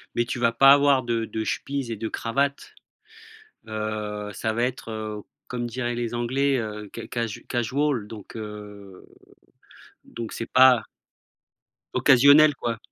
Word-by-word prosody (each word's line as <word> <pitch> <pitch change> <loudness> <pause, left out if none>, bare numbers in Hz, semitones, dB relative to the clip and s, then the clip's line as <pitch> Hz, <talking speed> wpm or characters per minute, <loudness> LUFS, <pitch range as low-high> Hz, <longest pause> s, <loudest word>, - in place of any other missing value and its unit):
mais 120 - +1
tu 125 - -4
vas 115 -1 +3
pas 135 +4 +7
avoir 140 -2 +4
de 115 -1 -1
de 110 0 -4
chemises 140 -4 -3
et 115 - -2
de 110 +1 -4
cravates, 140 +4 -2 0.9
heu, 105 -1 -4
ça 110 +3 -2
va 120 +2 -1
être 125 -2 -3
heu, 110 -1 -5 0.3
comme 120 -1 -3
diraient 120 0 -3
les 120 -1 -3
anglais, 130 +3 +1
heu, 105 -1 -6
ca - - -7
casu 115 -3 -4
casual 125 -1 -1
donc 105 0 -11
heu, 105 -3 -9 1.0
donc 115 -2 -7
c'est 115 - -6
pas 130 -2 +6 1.1
occasionnel, 145 +3 +6
quoi. 115 -3 -3
115 Hz, 145 wpm, -24 LUFS, 110-130 Hz, 1.1 s, pas